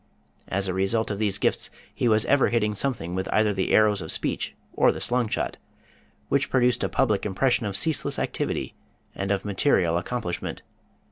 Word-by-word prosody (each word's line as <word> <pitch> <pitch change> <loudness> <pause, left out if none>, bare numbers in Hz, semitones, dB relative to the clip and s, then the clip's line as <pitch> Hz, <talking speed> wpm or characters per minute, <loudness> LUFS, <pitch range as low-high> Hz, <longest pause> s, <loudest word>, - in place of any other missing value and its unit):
As 95 +1 -1
a 95 - -1
result 95 +5 0
of 100 - -3
these 105 -2 +1
gifts - - 0 0.2
he - - 0
was 110 -1 +3
ever 140 -1 +3
hitting 105 -3 +1
something 105 -7 -2
with 95 +1 -3
either 105 -1 +3
the 95 -1 -1
arrows 105 -2 +4
of 80 - -3
speech - - -2 0.2
or - - +4
the - - -6
slungshot, 120 -3 -1 0.7
which 140 0 +1
produced 125 -2 +2
a - - 0
public 110 -7 +1
impression 115 +3 +1
of 100 -1 0
ceaseless 160 +7 +1
activity - - -2 0.4
and 95 0 -4
of 100 -1 0
material 95 - +2
accomplishment. 90 -3 -4
105 Hz, 175 wpm, -25 LUFS, 95-120 Hz, 0.7 s, arrows